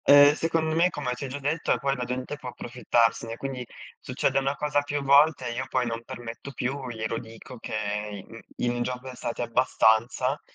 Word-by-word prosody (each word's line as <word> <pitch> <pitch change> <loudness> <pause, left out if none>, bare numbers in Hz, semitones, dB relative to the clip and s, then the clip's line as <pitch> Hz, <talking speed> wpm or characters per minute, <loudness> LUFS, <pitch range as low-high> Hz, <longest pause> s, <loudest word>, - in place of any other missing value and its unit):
Eh, 145 0 +9
secondo 160 -1 0
me, 170 +2 +4
come 140 -7 -3
ti 125 +3 -5
ho - - -4
già 135 +2 -5
detto, 150 +3 -1
ehm, - - +4
poi 140 0 0
la 125 -2 -3
gente 130 +3 -3
può 135 -4 -7
approfittarsene, 115 -2 0
quindi 135 -1 -4 0.4
succede - - 0
una 135 +1 0
cosa 150 -1 +1
più 145 0 -3
volte 140 -1 +5
e 120 - -3
io 130 +2 -3
poi 130 -1 +1
non 115 0 -3
permetto 120 +4 -8
più, 130 +1 -3
glielo 110 0 -3
dico 115 +2 -11
che 105 -2 -3
in 115 - -11 0.2
in 120 - +1
un 120 0 -2
giorno 125 +1 -4
è - - -11
stati 120 - -4
abbastanza 120 +2 +2
125 Hz, 205 wpm, -27 LUFS, 115-140 Hz, 0.4 s, Eh